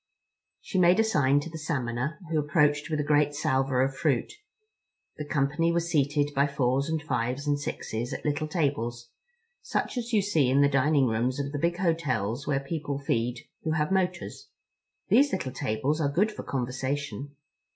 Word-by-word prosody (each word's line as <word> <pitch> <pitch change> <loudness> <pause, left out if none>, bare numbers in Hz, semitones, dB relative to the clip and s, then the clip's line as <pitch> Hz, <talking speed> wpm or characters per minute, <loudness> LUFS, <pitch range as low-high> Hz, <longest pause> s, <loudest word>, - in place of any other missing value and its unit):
She 190 - -2
made 180 +3 +5
a - - +6
sign 145 -9 +3
to 165 - -7
a - - -4
Salmoner, 130 -2 -2
who 160 - +2
approached 150 0 +2
with 155 -2 -1
a - - +1
great 145 0 +2
salver 130 -2 +1
of 135 0 -1
fruit. 155 - 0 0.8
The 150 - -5
company 150 +4 +1
were 170 - +2
seated 145 -3 +1
by 140 +1 +3
fours 140 0 0
and 160 0 0
fives 130 -1 -2
and 145 -1 +1
sixes 120 -4 -4
at - - -6
little 150 +1 0
tables, 120 -7 -2 0.5
such 250 - -2
as 240 0 -5
you 210 -4 +3
see 160 -10 +2
in 135 +2 +4
the 140 - +6
dining 140 0 +3
rooms 120 +3 0
of 140 0 -2
the 145 - -3
big 170 +2 0
hotels 145 - -1
where 135 -2 +1
people 145 0 -4
feed 120 -3 -1 0.2
who 160 - -1
have 150 +2 0
motors. 180 -2 -2 0.6
These 280 +2 +5
little 130 0 -2
tables 140 +8 -1
are 145 - +2
good 200 +9 +2
for - - -7
conversation. 135 +2 -3
145 Hz, 180 wpm, -27 LUFS, 130-160 Hz, 0.8 s, a